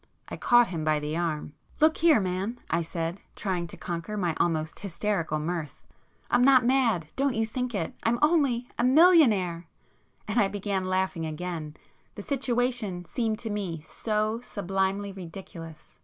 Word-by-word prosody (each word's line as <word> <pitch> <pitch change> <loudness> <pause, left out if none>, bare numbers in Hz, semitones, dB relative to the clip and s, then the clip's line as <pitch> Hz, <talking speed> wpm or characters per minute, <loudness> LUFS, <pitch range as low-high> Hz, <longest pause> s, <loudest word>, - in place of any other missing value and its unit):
I - - -5
caught 240 -1 +4
him 165 -3 -3
by 155 -1 +2
the 150 +1 -3
arm. 160 -3 -2 0.3
"Look 315 +1 +4
here 320 -6 +5
man," 190 +5 -2
I 170 - +2
said, 165 +2 -4 0.2
trying 180 -4 -2
to - - -10
conquer 170 +5 -4
my 175 -5 0
almost 160 -2 0
hysterical 190 -4 -1
mirth—"I'm 170 - -3
not 260 -2 +6
mad—don't 250 - +1
you 225 0 +1
think 250 +1 -3
it,—I'm 225 +6 -1
only 280 -6 +2
a—millionaire!" 240 - +5 0.6
And 210 +3 +1
I 205 - +4
began 195 -1 -2
laughing 185 -3 -1
again; 155 -1 -5 0.4
the 205 - -7
situation 245 -8 -1
seemed 220 +4 -1
to 220 - -2
me 180 -7 -3
so 215 +4 -1
sublimely 195 -1 -2
ridiculous. 170 -3 -10
195 Hz, 140 wpm, -27 LUFS, 170-240 Hz, 0.6 s, not